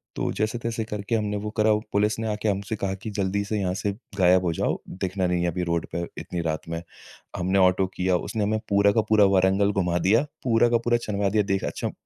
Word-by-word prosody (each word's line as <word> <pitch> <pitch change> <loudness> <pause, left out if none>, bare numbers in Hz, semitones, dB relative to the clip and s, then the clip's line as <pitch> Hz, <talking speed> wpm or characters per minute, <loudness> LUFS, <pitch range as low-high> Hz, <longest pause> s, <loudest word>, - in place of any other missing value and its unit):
तो - - -1
जैसे-तैसे 115 +1 -2
करके 105 +1 -3
हमने 105 -2 -1
वो 105 +1 -4
करा। 110 0 +4 0.2
पुलिस 105 +1 +2
ने 115 - -2
आके 105 0 -2
हमसे 100 +2 -2
कहा 100 -2 -2
कि, 105 +3 -7
"जल्दी 100 0 -1
से 105 +1 -2
यहाँ 90 -2 0
से 100 - 0 0.3
गायब 90 -1 +5
हो 85 - +1
जाओ। - - -1
दिखना 95 0 -2
नहीं 90 0 0
है - - +1
अभी 90 +1 -2
रोड 85 -2 -1
पर 85 0 -2
इतनी 90 - -4
रात 80 -1 -3
में।" 85 0 -3 0.6
हमने 95 +2 +1
ऑटो 95 0 +4
किया। 95 0 +1
उसने 110 +4 -3
हमें 110 +1 0
पूरा 100 0 +4
का 110 - +2
पूरा 105 -2 +6
वारंगल 95 +2 +3
घुमा 90 -3 0
दिया। 115 +7 +4 0.2
पूरा 120 -1 +3
का 120 - +3
पूरा 120 0 +3
छानवा 100 -1 0
दिया। 105 +1 +2
देख 95 -1 -1
अच्छा - - -3
100 Hz, 230 wpm, -25 LUFS, 90-110 Hz, 0.6 s, पूरा